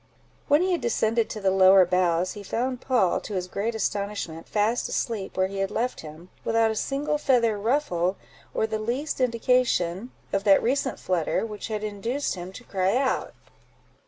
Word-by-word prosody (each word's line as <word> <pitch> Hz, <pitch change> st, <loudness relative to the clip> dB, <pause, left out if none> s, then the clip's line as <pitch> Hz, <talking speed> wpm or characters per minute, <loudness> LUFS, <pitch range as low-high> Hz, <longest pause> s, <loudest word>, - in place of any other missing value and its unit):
When 295 Hz, +4 st, +4 dB
he 375 Hz, -, +1 dB
had 345 Hz, -, 0 dB
descended 230 Hz, -1 st, +1 dB
to 215 Hz, -, -5 dB
the 195 Hz, -2 st, +2 dB
lower 190 Hz, 0 st, +7 dB
boughs, 180 Hz, 0 st, +1 dB
he 205 Hz, -, -8 dB
found 250 Hz, +5 st, -2 dB
Poll, 245 Hz, -9 st, +2 dB
to 210 Hz, -, -7 dB
his 180 Hz, -1 st, -2 dB
great 215 Hz, +5 st, -2 dB
astonishment, 200 Hz, -6 st, -3 dB
fast 215 Hz, +3 st, +1 dB
asleep 215 Hz, -6 st, -3 dB
where 185 Hz, -, +3 dB
he 195 Hz, +1 st, -5 dB
had 195 Hz, 0 st, 0 dB
left 240 Hz, +4 st, -2 dB
him, 160 Hz, +3 st, -11 dB
without 225 Hz, -1 st, +2 dB
a -, -, -3 dB
single 285 Hz, +5 st, -1 dB
feather 240 Hz, -6 st, +3 dB
ruffled 200 Hz, -, 0 dB, 0.4 s
or -, -, 0 dB
the 220 Hz, -1 st, -3 dB
least 255 Hz, +6 st, -2 dB
indication 235 Hz, -5 st, +1 dB, 0.2 s
of 195 Hz, 0 st, +1 dB
that 200 Hz, -1 st, +5 dB
recent 265 Hz, 0 st, 0 dB
flutter 180 Hz, +3 st, 0 dB
which 210 Hz, -2 st, -6 dB
had 215 Hz, -1 st, -3 dB
induced 220 Hz, +7 st, -2 dB
him 180 Hz, 0 st, -7 dB
to 245 Hz, -, -11 dB
cry 195 Hz, +1 st, 0 dB
out. 265 Hz, -1 st, -1 dB
215 Hz, 180 wpm, -25 LUFS, 190-245 Hz, 0.4 s, lower